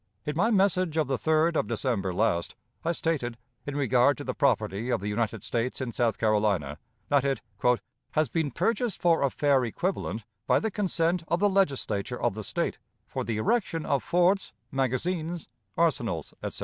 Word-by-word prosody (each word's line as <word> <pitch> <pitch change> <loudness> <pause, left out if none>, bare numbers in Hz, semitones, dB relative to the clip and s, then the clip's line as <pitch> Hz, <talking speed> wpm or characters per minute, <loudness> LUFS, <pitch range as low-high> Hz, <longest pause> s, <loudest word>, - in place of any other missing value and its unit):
In 150 - -2
my 200 +8 +3
message 185 -6 +2
of 155 - +3
the 135 - +1
3d 160 +4 +2
of - - +1
December 100 -8 -1
last, 90 -3 0 0.3
I 165 - +1
stated, 145 -8 -1 0.3
in 145 - -3
regard 135 -1 +3
to - - -6
the - - -3
property 105 +7 +1
of 125 - +1
the 100 - -4
United 110 0 -1
States 120 +1 -1
in 130 -2 -3
South 115 -1 +1
Carolina, 105 -9 +1 0.3
that 140 -2 +4
it 135 -3 0 0.7
"has 155 -1 +2
been 150 +5 0
purchased 230 - 0
for 170 -2 +3
a 140 - +3
fair 140 -1 +2
equivalent 115 - -2 0.2
'by - - +4
the 220 - -2
consent 175 -4 0
of 170 - +1
the 205 +1 +4
Legislature 130 - 0
of - - +1
the 110 +1 -6
State, - - -2 0.3
for - - -4
the 115 -2 -2
erection 165 - 0
of 140 -2 +1
forts, 180 +3 +2 0.2
magazines, 155 +6 -1 0.3
arsenals,' 120 - 0
etc. - - -4
140 Hz, 175 wpm, -28 LUFS, 115-170 Hz, 0.7 s, that